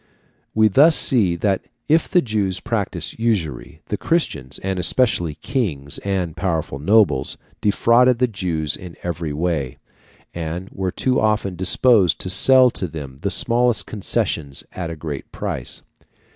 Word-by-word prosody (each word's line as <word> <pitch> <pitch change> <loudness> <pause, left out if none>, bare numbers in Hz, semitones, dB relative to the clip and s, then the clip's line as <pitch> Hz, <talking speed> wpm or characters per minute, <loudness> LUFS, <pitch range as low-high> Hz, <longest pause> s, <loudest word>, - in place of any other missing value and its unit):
We 110 0 +5
thus 145 - +5
see 105 -10 +3
that 95 +2 0 0.3
if 160 +2 +2
the 180 -2 +3
Jews 100 -5 -1
practised 100 -7 -4
usury, 85 - -2
the 105 - -2
Christians, 75 - -2
and 95 -1 -2
especially 90 - +1
kings 80 - -3
and 95 -5 -2
powerful 80 -7 -2
nobles, 95 -4 +2 0.2
defrauded 120 +4 +3
the 125 - +3
Jews 85 - -1
in 90 -2 -11
every 85 -3 -3
way, 75 -4 -2 0.6
and 85 +3 -5
were 95 -1 -3
too 130 +6 0
often 105 -3 0
disposed 95 +1 +3
to 90 - -1
sell 130 +6 +6
to 95 - -4
them 70 -4 -9
the - - -1
smallest 120 0 +3
concessions 80 -8 -2
at 90 -3 -5
a 85 - -5
great 75 -3 -7
price. - - -5
95 Hz, 145 wpm, -20 LUFS, 80-115 Hz, 0.6 s, sell